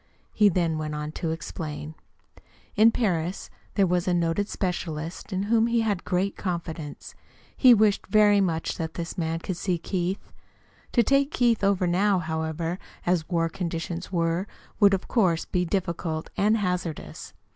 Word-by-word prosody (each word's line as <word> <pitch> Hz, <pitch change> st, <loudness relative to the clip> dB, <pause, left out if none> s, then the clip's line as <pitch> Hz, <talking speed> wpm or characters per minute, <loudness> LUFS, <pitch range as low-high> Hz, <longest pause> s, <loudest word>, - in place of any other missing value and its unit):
He 210 Hz, -1 st, +5 dB
then 165 Hz, -3 st, 0 dB
went 155 Hz, -1 st, -3 dB
on 150 Hz, 0 st, -4 dB
to 165 Hz, +1 st, -3 dB
explain. 155 Hz, -1 st, -5 dB, 0.8 s
In 220 Hz, +2 st, +7 dB
Paris 180 Hz, -6 st, -1 dB, 0.2 s
there 200 Hz, -, +4 dB
was 180 Hz, 0 st, 0 dB
a 180 Hz, -, +2 dB
noted 170 Hz, +4 st, 0 dB
specialist 170 Hz, -3 st, -4 dB
in 190 Hz, 0 st, -1 dB
whom 225 Hz, +2 st, +3 dB
he 235 Hz, 0 st, +2 dB
had 205 Hz, -5 st, -1 dB
great 190 Hz, +2 st, 0 dB
confidence. 170 Hz, -5 st, -5 dB, 0.4 s
He 250 Hz, -3 st, +7 dB
wished 210 Hz, -2 st, +2 dB
very 205 Hz, 0 st, +5 dB
much 165 Hz, -4 st, -1 dB
that 160 Hz, -1 st, -4 dB
this 170 Hz, -1 st, -5 dB
man 165 Hz, -1 st, -1 dB
could 185 Hz, 0 st, -4 dB
see 180 Hz, -1 st, 0 dB
Keith. 185 Hz, +3 st, -3 dB, 0.6 s
To 240 Hz, -, +5 dB
take 275 Hz, +4 st, +3 dB
Keith 240 Hz, -8 st, +2 dB
over 195 Hz, -2 st, +3 dB
now, 190 Hz, +3 st, +2 dB
however, 160 Hz, +1 st, -2 dB, 0.3 s
as 175 Hz, -3 st, +1 dB
war 165 Hz, -2 st, +1 dB
conditions 170 Hz, +1 st, -4 dB
were, 170 Hz, +2 st, 0 dB, 0.3 s
would, 200 Hz, -2 st, +6 dB
of 190 Hz, -, -6 dB
course, 180 Hz, -8 st, +2 dB
be 180 Hz, -1 st, 0 dB
difficult 170 Hz, -3 st, -2 dB
and 210 Hz, +3 st, +3 dB
hazardous. 180 Hz, -5 st, -4 dB
180 Hz, 155 wpm, -26 LUFS, 165-200 Hz, 0.8 s, In